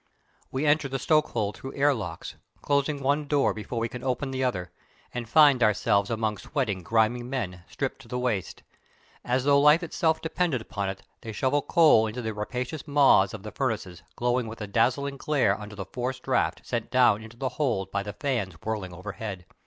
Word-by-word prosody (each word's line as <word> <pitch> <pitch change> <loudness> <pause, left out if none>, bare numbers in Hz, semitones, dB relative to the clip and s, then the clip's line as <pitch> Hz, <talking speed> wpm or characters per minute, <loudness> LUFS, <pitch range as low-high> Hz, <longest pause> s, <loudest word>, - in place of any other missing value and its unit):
We 135 +3 -1
enter 145 -1 +3
the 135 - -2
stokehold 125 -9 +1
through 135 - -8
air 145 +1 +4
locks, 115 -5 -6 0.3
closing 140 0 0
one 145 +2 +1
door 145 -1 +2
before 110 +3 -6
we 115 0 0
can 125 0 -8
open 135 +1 -1
the 130 0 -2
other, 95 -9 -2 0.4
and 120 -2 -5
find 145 -2 +6
ourselves 100 -2 +3
among 110 -3 -1
sweating, 115 -11 -2
grimy 110 +5 +2
men, 120 -9 -4
stripped - - -4
to - - -15
the 125 - -3
waist. 120 -7 -2 0.6
As 125 +1 0
though 140 0 +5
life 150 +4 +6
itself 160 -1 +1
depended 160 -4 0
upon 100 -3 -4
it 95 0 -7 0.2
they 115 - -6
shovel 135 +6 +1
coal 155 -9 +5
into 120 +3 -5
the 110 0 -2
rapacious 125 +8 -4
maws 140 -9 +5
of 105 -1 -10
furnaces 105 -10 -3
glowing 125 0 0
with 110 +1 -8
a - - -2
dazzling 130 +7 +1
glare 135 -9 +2
under 105 0 -8
the 100 -2 -5
"forced 125 +5 -4
draught" 90 -11 0
sent 120 -2 -3
down 125 -5 +4
into 110 +1 -12
the 130 +1 -1
hold 115 -12 -1
by 100 - 0
the 105 0 -6
fans 115 - -2
whirling 100 -5 -3
overhead. 95 0 -6
125 Hz, 190 wpm, -27 LUFS, 105-140 Hz, 0.6 s, find